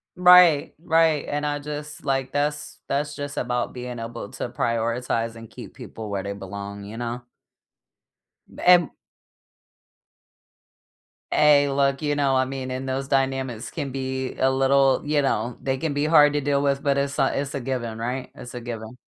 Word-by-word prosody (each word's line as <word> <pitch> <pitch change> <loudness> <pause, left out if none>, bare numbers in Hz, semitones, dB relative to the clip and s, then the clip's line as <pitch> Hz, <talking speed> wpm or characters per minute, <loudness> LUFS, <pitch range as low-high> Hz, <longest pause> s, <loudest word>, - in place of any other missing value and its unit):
Right, 180 -4 +6
right 160 -3 +3
and 145 0 -2
I 145 0 -1
just 150 +1 -7
like 135 -1 -1
that's 145 +1 -2
that's 145 +1 -2
just 145 0 -6
about 125 0 -1
being 125 -1 -6
able 115 -2 -6
to - - -5
prioritize 115 -1 -1
and 115 -1 -11
keep - - -11
people 110 -2 -8
where 100 -1 -3
they 100 - -4
belong, 100 +1 -7
you 105 +3 -8
know? 120 0 -4 1.4
And 175 -3 +6 2.4
Hey, 145 -1 +5
look, 140 0 +1
you 145 -1 0
know, 140 -2 +2
I 130 0 +3
mean, 130 -1 -5
and 130 +1 -4
those 135 +1 -2
dynamics 135 -4 -1
can 140 - -5
be 130 0 -3
a 130 - +3
little, 135 0 +3
you 150 0 +2
know, 125 -3 -1
they 135 -1 -1
can 155 +2 -2
be 145 +1 0
hard 150 -2 +6
to 145 - 0
deal 140 0 +1
with, 140 -1 +1
but 140 -1 +2
it's 140 0 -1
a 135 0 +2
it's 140 -1 -5
a 140 - -3
given, 120 -3 -3
right? 125 +3 -3
It's 120 -1 -10
a 125 - -6
given. 115 0 -7
135 Hz, 175 wpm, -24 LUFS, 120-145 Hz, 2.4 s, Right